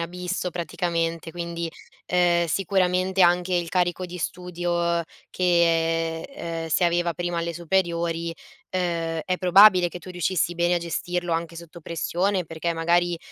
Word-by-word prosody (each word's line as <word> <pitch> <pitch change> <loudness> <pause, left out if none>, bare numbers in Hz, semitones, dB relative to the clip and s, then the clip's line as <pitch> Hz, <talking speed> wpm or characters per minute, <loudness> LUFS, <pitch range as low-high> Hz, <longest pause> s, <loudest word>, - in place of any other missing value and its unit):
abisso 180 +2 -3
praticamente, 170 -1 -2
quindi, 170 0 -4 0.4
ehm, 175 -1 +3
sicuramente 185 +1 +1
anche 180 +1 +4
il 175 -1 0
carico 180 +1 0
di 180 0 -8
studio 175 -1 -1 0.3
che, 165 -2 +1
ehm, 165 - -6
si 160 - +2
aveva 175 0 +2
prima 175 +2 -3
alle 170 0 -2
superiori, 170 -1 -1 0.4
uhm, 170 -3 -1
è 185 -1 -1
probabile 185 0 +6
che 180 - -8
tu 175 - -13
riuscissi 175 -1 0
bene 175 +1 +2
a - - +1
gestirlo 175 +1 -3
anche 165 0 -3
sotto 170 0 -11
pressione, 180 +3 -1
perché 165 +1 -3
magari, 170 +1 +1
175 Hz, 140 wpm, -24 LUFS, 170-180 Hz, 0.4 s, probabile